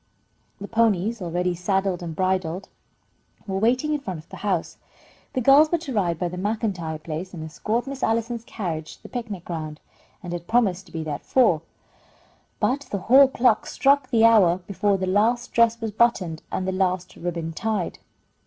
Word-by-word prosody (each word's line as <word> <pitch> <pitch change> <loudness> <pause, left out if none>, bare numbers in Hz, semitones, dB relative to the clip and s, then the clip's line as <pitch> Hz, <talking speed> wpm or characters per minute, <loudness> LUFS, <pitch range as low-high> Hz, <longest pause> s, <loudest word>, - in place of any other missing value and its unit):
The 200 - -6
ponies, 225 -1 +1
already 180 +1 -1
saddled 190 +1 -1
and 165 -2 -5
bridled, 185 0 -1 0.8
were 190 -1 -2
waiting 255 +8 +2
in 300 - 0
front 190 -11 -5
of 155 +1 -13
the - - -9
house. 190 -5 -2 0.6
The 255 - 0
girls 280 +5 +6
were 345 - +3
to 310 -5 -6
ride 175 -6 +1
by 180 - -1
the 180 +1 -6
MacIntyre 195 -6 -2
place 165 +4 -6
and 160 - -6
escort 215 +10 -2
Miss 270 -1 -6
Allison's 230 +1 0
carriage 165 -9 -5
to - - -34
the - - -10
picnic 220 -8 -5
ground, 155 -3 -5 0.4
and 175 -1 -5
had 175 0 -6
promised 205 -6 +1
to - - -17
be 160 -1 -4
there 155 -1 -3
at - - -6
four, 220 -12 +3 1.0
but 275 +1 0
the 200 - -2
hall 265 +8 +6
clock 245 -4 +2
struck 275 -1 +2
the 230 -2 +4
hour 200 -7 +6
before 200 +1 +1
the 190 - -2
last 220 +6 +1
dress 230 0 +4
was 225 -2 -3
buttoned 195 -8 +1
and 185 - -2
the - - +1
last 185 -1 -1
ribbon 170 -2 -4
tied. 215 -1 -2
195 Hz, 185 wpm, -24 LUFS, 175-230 Hz, 1.0 s, girls